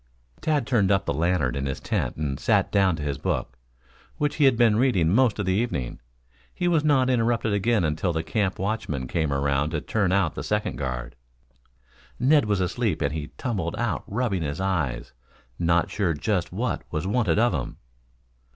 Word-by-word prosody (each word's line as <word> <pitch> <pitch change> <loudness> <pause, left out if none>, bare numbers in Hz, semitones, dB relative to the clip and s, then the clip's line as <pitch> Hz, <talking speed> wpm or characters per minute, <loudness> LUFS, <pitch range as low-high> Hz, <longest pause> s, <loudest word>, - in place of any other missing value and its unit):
Tad 150 -5 +1
turned 105 -7 +2
up 95 0 +2
the - - 0
lantern 85 -6 +1
in 70 0 -2
his 65 - -3
tent - - -2
and 70 -3 -3
sat - - +2
down 95 -4 +3
to 75 - -6
his 70 -1 -3
book, 60 - -2 0.6
which 150 -1 -1
he 150 - +4
had 130 -4 +4
been 115 -3 +4
reading 115 -11 +3
most 120 -2 +3
of 105 - -2
the 95 - +1
evening. 95 - -2 0.6
He 175 - -1
was 165 -4 +2
not 140 -4 +3
interrupted 115 -3 +1
again 105 0 +2
until 80 +3 0
the 80 -1 -2
camp 100 +1 -1
watchmen 95 -10 -2
came 80 +1 -1
around 70 +1 +1
to 80 -1 -2
turn 100 -2 0
out 95 -5 +2
the - - -5
second 105 0 -2
guard. - - -4 1.0
Ned 140 +2 +4
was 100 -3 0
asleep 90 - -1
and - - -1
he 75 -2 -4
tumbled 95 -9 -2
out 120 -9 -2
rubbing 105 -4 -1
his 75 +1 -3
eyes, 85 -10 -2 0.5
not 85 0 +2
sure 90 -6 0
just 90 +3 -1
what - - -2
was 75 +3 -2
wanted 100 -4 +1
of 120 +2 +3
him. 65 - -4
95 Hz, 190 wpm, -25 LUFS, 75-115 Hz, 1.0 s, he